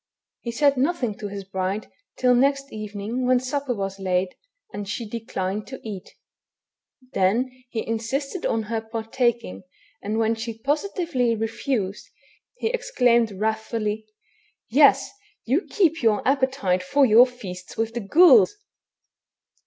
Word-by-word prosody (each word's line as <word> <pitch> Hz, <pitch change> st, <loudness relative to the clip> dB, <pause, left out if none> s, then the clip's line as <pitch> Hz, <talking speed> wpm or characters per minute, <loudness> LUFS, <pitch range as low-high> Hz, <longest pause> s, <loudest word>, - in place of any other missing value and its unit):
He 235 Hz, -, -5 dB
said 280 Hz, +3 st, +3 dB
nothing 265 Hz, -5 st, 0 dB
to 210 Hz, -, -4 dB
his 200 Hz, 0 st, -6 dB
bride 190 Hz, +2 st, -3 dB, 0.3 s
till 250 Hz, -1 st, +4 dB
next 275 Hz, +2 st, +1 dB
evening 215 Hz, +3 st, -4 dB
when 255 Hz, 0 st, +4 dB
supper 260 Hz, 0 st, -2 dB
was 195 Hz, -1 st, -4 dB
laid, 185 Hz, -1 st, 0 dB, 0.4 s
and 205 Hz, -1 st, -5 dB
she 225 Hz, +2 st, -4 dB
declined 210 Hz, -2 st, -4 dB
to 265 Hz, -, -8 dB
eat; 200 Hz, -4 st, -8 dB, 1.0 s
then 220 Hz, +8 st, +2 dB, 0.2 s
he 225 Hz, -2 st, -3 dB
in 225 Hz, 0 st, -2 dB
sisted 275 Hz, -, -3 dB
on 225 Hz, -1 st, 0 dB
her 220 Hz, +1 st, -3 dB
partaking, 225 Hz, 0 st, -2 dB, 0.4 s
and 215 Hz, +2 st, -2 dB
when 225 Hz, 0 st, +2 dB
she 225 Hz, 0 st, -5 dB
positively 290 Hz, -, 0 dB
refused, 220 Hz, -2 st, -3 dB, 0.5 s
he 450 Hz, -, -1 dB
exclaimed 245 Hz, -, +2 dB
wrathfully, 220 Hz, +1 st, -2 dB, 0.2 s
— -, -, -37 dB
" -, -, -63 dB
Yes, -, -, +5 dB, 0.3 s
you 280 Hz, -, 0 dB
keep 330 Hz, -6 st, +2 dB
your 220 Hz, -2 st, +2 dB
appetite 260 Hz, -9 st, +1 dB
for 270 Hz, +10 st, +3 dB
your 240 Hz, +2 st, +7 dB
feast 185 Hz, -7 st, -9 dB
with 225 Hz, 0 st, -1 dB
the 240 Hz, -, -2 dB
ghouls 360 Hz, -, +6 dB
230 Hz, 140 wpm, -24 LUFS, 210-265 Hz, 1.0 s, your